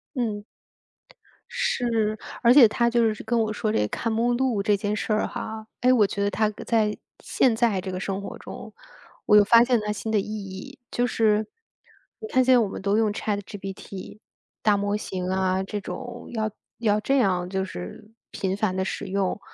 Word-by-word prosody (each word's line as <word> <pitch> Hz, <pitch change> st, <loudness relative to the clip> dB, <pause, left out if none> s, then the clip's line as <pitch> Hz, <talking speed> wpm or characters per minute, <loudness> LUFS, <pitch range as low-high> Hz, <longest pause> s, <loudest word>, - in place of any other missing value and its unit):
嗯。 215 Hz, -5 st, -2 dB, 1.1 s
是， 230 Hz, -, 0 dB, 0.2 s
而 235 Hz, 0 st, +6 dB
且 260 Hz, -4 st, +9 dB
他 235 Hz, +2 st, +1 dB
就 235 Hz, -2 st, +2 dB
是 215 Hz, -, -9 dB
跟 235 Hz, -1 st, 0 dB
我 220 Hz, -1 st, 0 dB
说 215 Hz, 0 st, -1 dB
这 -, -, +1 dB
个 105 Hz, -, +1 dB
看 230 Hz, -, -2 dB
目 235 Hz, +2 st, +1 dB
录 240 Hz, -5 st, +1 dB
这 210 Hz, -1 st, +3 dB
件 205 Hz, +1 st, -2 dB
事 215 Hz, -, -1 dB
儿 215 Hz, -, +1 dB
哈， 220 Hz, 0 st, -6 dB
哎， 250 Hz, +1 st, +5 dB
我 215 Hz, -5 st, +4 dB
觉 200 Hz, +1 st, -2 dB
得 200 Hz, -, +2 dB
它 215 Hz, +1 st, +1 dB, 0.2 s
在 215 Hz, -2 st, +2 dB, 0.2 s
现 245 Hz, -4 st, +2 dB
在 225 Hz, -4 st, +2 dB
这 185 Hz, 0 st, -5 dB
个 185 Hz, -, -4 dB
生 195 Hz, 0 st, -3 dB
活 -, -, -7 dB
中， -, -, -9 dB, 0.5 s
我 210 Hz, -, +6 dB
又 205 Hz, -, +8 dB
发 230 Hz, +3 st, +6 dB
现 245 Hz, -1 st, +2 dB
它 210 Hz, -, -1 dB
新 210 Hz, +2 st, -4 dB
的 215 Hz, -, +3 dB
意 195 Hz, -, -3 dB
义。 210 Hz, +6 st, -7 dB
就 245 Hz, -, +1 dB
是 220 Hz, -2 st, +2 dB, 0.7 s
你 435 Hz, -, -6 dB
看 260 Hz, -10 st, +3 dB
现 260 Hz, +1 st, +5 dB
在 -, -, +7 dB
我 220 Hz, -, +2 dB
们 -, -, -7 dB
都 200 Hz, +2 st, +1 dB
用 220 Hz, -2 st, +2 dB
ChatGPT， 200 Hz, -1 st, -6 dB, 0.4 s
大 210 Hz, -1 st, +4 dB
模 205 Hz, +1 st, 0 dB
型 185 Hz, -3 st, -4 dB
啊， 190 Hz, 0 st, +1 dB
这 205 Hz, +2 st, -4 dB
种 240 Hz, +4 st, -7 dB
要 215 Hz, -1 st, -1 dB, 0.3 s
要 215 Hz, -2 st, +2 dB
这 270 Hz, +6 st, +1 dB
样 185 Hz, -7 st, +1 dB
就 190 Hz, 0 st, -1 dB
是 190 Hz, -, -8 dB, 0.2 s
频 190 Hz, 0 st, -2 dB
繁 205 Hz, -3 st, 0 dB
地 190 Hz, -, 0 dB
使 -, -, -4 dB
用， 195 Hz, +1 st, -1 dB
210 Hz, 235 characters per minute, -25 LUFS, 195-230 Hz, 1.1 s, 且